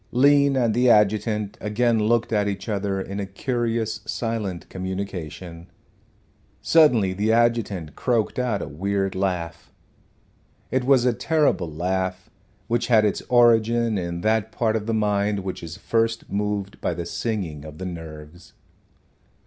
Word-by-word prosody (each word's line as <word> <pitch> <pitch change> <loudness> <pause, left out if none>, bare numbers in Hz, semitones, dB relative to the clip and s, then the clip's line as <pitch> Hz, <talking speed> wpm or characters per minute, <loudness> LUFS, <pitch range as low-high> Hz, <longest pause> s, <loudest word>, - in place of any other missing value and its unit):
Lean 140 +2 +4
and 120 -4 +2
the 125 +2 +3
adjutant 105 -1 +2
again 115 +2 +1
looked 115 +2 +1
at 105 -1 +2
each 95 -1 -4
other 100 -2 -1
in 100 +1 -5
a 100 - -2
curious 115 0 -2
silent 110 -7 -3
communication. 90 -3 -6 0.9
Suddenly 125 - +4
the 105 +4 0
adjutant 115 -8 +1
croaked 120 -1 0
out 120 -5 -1
a - - -6
weird 95 +5 -2
laugh. 90 -4 -3 1.0
It 130 -1 0
was 130 -2 +4
a 125 - +3
terrible 125 - +1
laugh, 95 +3 -2 0.3
which 120 0 0
had 110 -3 +5
its 105 - 0
origin 115 -2 +4
in 85 -1 -4
that 110 +1 +1
part 110 -2 0
of 110 -1 -3
the 115 - 0
mind 105 -1 +1
which 95 -1 -5
is 85 +2 -8
first 115 +2 -1
moved 100 -1 -2
by 85 - -1
the 85 0 -4
singing 85 -4 -3
of 75 -1 -10
the 95 - -6
nerves. 80 -1 -9
105 Hz, 145 wpm, -23 LUFS, 95-115 Hz, 1.0 s, had